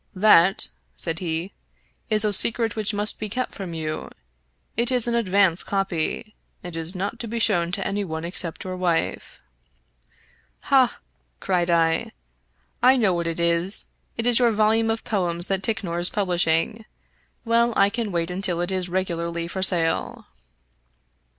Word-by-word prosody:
" - - -39 0.2
That," 175 +4 +5 0.3
said 165 -1 -3
he, 170 +1 -4 0.3
" - - -42
is 215 -1 +6
a 210 - +2
secret 225 +2 +2
which 215 -2 0
must 205 0 +1
be 215 - -4
kept 255 +4 -3
from 185 -5 -7
you. 155 -1 -4 0.7
It 235 +3 +1
is 245 -2 +3
an 235 - 0
advance 195 -6 +2
copy, 195 +2 -2 0.3
and 175 -2 -7
is 165 +3 -3
not 200 +6 -4
to 235 - -4
be 230 +2 -4
shown 175 -7 +1
to 195 0 -2
any 200 +1 -1
one 160 -3 -5
except 170 -1 -5
your 185 0 -5
wife." 175 -2 -2 0.6
" - - -36
Ha 260 -3 +4
I - - -28 0.2
" - - -45
cried 180 -2 0
I, 165 -1 +1 0.3
" 60 0 -43
I 265 - +2
know 210 -7 +2
what 170 -1 -2
it 165 0 -3
is. 170 +4 0 0.3
It 230 - -2
is 245 -1 +4
your 240 -1 +4
volume 220 +1 +2
of 225 0 -2
poems 175 -4 0
that 190 -1 -1
Ticknor 190 -5 -1
is 175 - +7
publishing. 180 +2 0 0.6
Well, 235 +1 +2
I 200 0 +3
can 225 -2 -3
wait 170 0 -2
until 180 -2 -1
it 175 +2 -1
is 185 -1 -1
regularly 170 -2 -3
for 190 +2 -5
sale." 170 -3 +1
190 Hz, 175 wpm, -23 LUFS, 170-215 Hz, 0.7 s, is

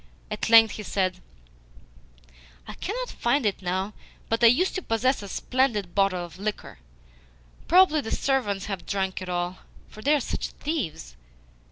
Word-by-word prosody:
At 210 +1 -2
length 225 -1 +7
he - - -5
said: 185 -3 -1 1.5
"I - - -7
cannot - - -4
find 245 +2 0
it 200 -2 0
now, 190 +3 -2 0.4
but 230 +1 0
I - - +10
used 325 +11 +3
to 375 - -3
possess 255 -1 +1
a 200 - -7
splendid 215 -4 0
bottle 195 -3 +1
of 170 +1 -14
liquor. 205 - -5 0.9
Probably 350 -3 +5
the 225 - -6
servants 210 -9 0
have 195 -4 -5
drunk 190 -1 -2
it 185 - -6
all, 175 +1 -2 0.3
for 215 - -12
they 290 +6 +3
are - - +2
such 250 - -3
thieves. 175 - -4
210 Hz, 160 wpm, -26 LUFS, 190-265 Hz, 1.5 s, I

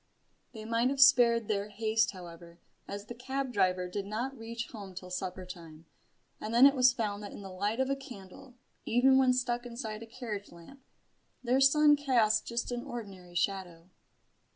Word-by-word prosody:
They 220 -2 -9
might 230 +2 +1
have 275 0 -3
spared 235 -4 +6
their 205 -1 -1
haste, 220 +1 +1
however, 170 -2 -11 0.3
as 200 +1 -6
the 240 - -8
cab 265 +2 -4
driver 185 -3 +1
did 195 +2 -5
not 240 +6 -3
reach 230 0 -6
home 200 -4 -9
till 180 0 -9
supper 185 0 -4
time, 165 -3 -11 0.5
and 215 - -5
then 240 +3 +7
it 280 - +7
was 255 -2 +5
found 210 -4 -3
that 205 - -8
in 200 - -9
the 195 - -8
light 205 +5 -2
of 265 - +1
a - - +1
candle, 250 -2 -12 0.3
even 265 +3 +4
when 260 -1 +4
stuck 245 -1 -1
inside 235 -3 -6
a 230 - -9
carriage 220 -4 -7
lamp, 170 +11 -15 0.6
their 255 +2 +2
son 295 +2 +6
cast 235 -7 +2
just 235 +1 -3
an 240 0 -3
ordinary 190 -7 -9
shadow. 180 -2 -3
225 Hz, 180 wpm, -30 LUFS, 195-250 Hz, 0.6 s, then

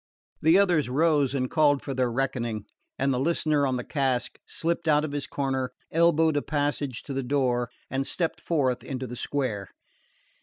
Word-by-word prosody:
The 160 +4 +6
others 175 -9 +3
rose 145 -1 +2
and 130 -2 0
called 145 -1 +3
for 140 - -4
their 125 -2 0
reckoning; 120 -4 -2 0.3
and 135 0 +1
the 125 - 0
listener 150 -1 +2
on 130 - 0
the 125 - -4
cask 130 -4 -1
slipped 170 0 -1
out 150 0 +4
of 150 - -5
his 145 -1 -3
corner, 130 -2 -2 0.2
elbowed 160 -2 +3
a - - +2
passage 145 -4 -2
to 140 - -6
the 135 - -1
door 125 -2 0 0.2
and 135 +1 -2
stepped 165 -3 -2
forth 130 -7 0
into 130 -1 -4
the 125 0 -7
square. 120 -8 -2
140 Hz, 180 wpm, -27 LUFS, 130-155 Hz, 0.3 s, The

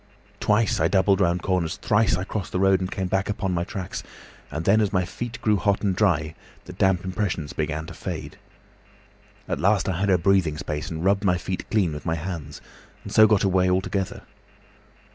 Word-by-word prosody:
"Twice 105 0 +2
I 80 - +3
doubled 95 +1 +3
round 90 -1 +1
corners, 90 -4 0
thrice 110 -1 +2
I 90 - -2
crossed 100 -1 -4
the 90 - 0
road 95 0 +4
and 90 0 -3
came 95 -1 -3
back 95 +2 -1
upon 100 -2 -2
my 85 -1 0
tracks, 95 -1 -5 0.5
and 80 +2 -4
then, 110 +3 +4
as 105 - +1
my 90 -2 +1
feet 120 +5 -6
grew 105 -1 +3
hot 100 +2 0
and 95 -3 +1
dry, 80 -6 +1 0.3
the 90 - -9
damp 95 -1 +1
impressions 95 -5 -2
began 75 0 -2
to - - -9
fade. - - -6 1.1
At - - -2
last 100 +3 +2
I 90 -3 -1
had 100 0 +1
a 95 - +5
breathing 85 -3 +2
space 75 -2 -4
and 80 +1 -4
rubbed 100 +1 +2
my 90 -2 +3
feet 90 +1 -5
clean 95 -6 +1
with 75 +3 -7
my 80 - +1
hands, 80 -3 -6 0.4
and - - -8
so 110 0 +7
got 105 -1 +3
away 95 -1 +3
altogether. 95 +1 -1
95 Hz, 200 wpm, -24 LUFS, 85-100 Hz, 1.1 s, so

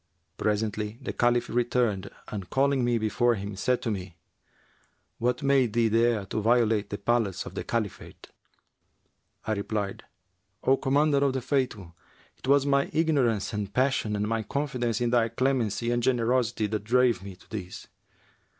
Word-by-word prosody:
Presently 105 0 -1
the - - -5
Caliph 120 0 +2
returned 120 -5 0 0.2
and 100 -5 -6
calling 135 -1 +2
me 120 -1 +2
before 115 +2 +2
him, 100 0 -6
said 125 +6 0
to 115 - -1
me, 90 -4 -6 1.0
'What 125 +4 0
made 135 -5 +3
thee 115 -1 +3
dare 115 -2 +2
to 110 +3 -3
violate 110 -2 +2
the 100 - -4
palace 105 -2 0
of - - -8
the - - -4
Caliphate?' 110 -4 -4 1.2
I - - -2
replied, 100 -1 -3 0.6
'O 135 +1 +4
Commander 140 +2 +2
of 140 -1 +2
the 130 - -2
Faithful, 125 - -2 0.5
'twas 140 +1 +3
my 140 0 +2
ignorance 135 -11 +1
and 105 -1 -3
passion 130 -3 +1
and 105 +1 -1
my 115 0 0
confidence 120 -1 -2
in 120 -1 +1
thy 115 -2 +3
clemency 120 -2 0
and 120 0 +1
generosity 120 -2 +1
that 105 -1 -2
drave 120 -1 +3
me 95 -1 -9
to 90 - -22
this.' 95 -4 -6
115 Hz, 155 wpm, -27 LUFS, 105-130 Hz, 1.2 s, O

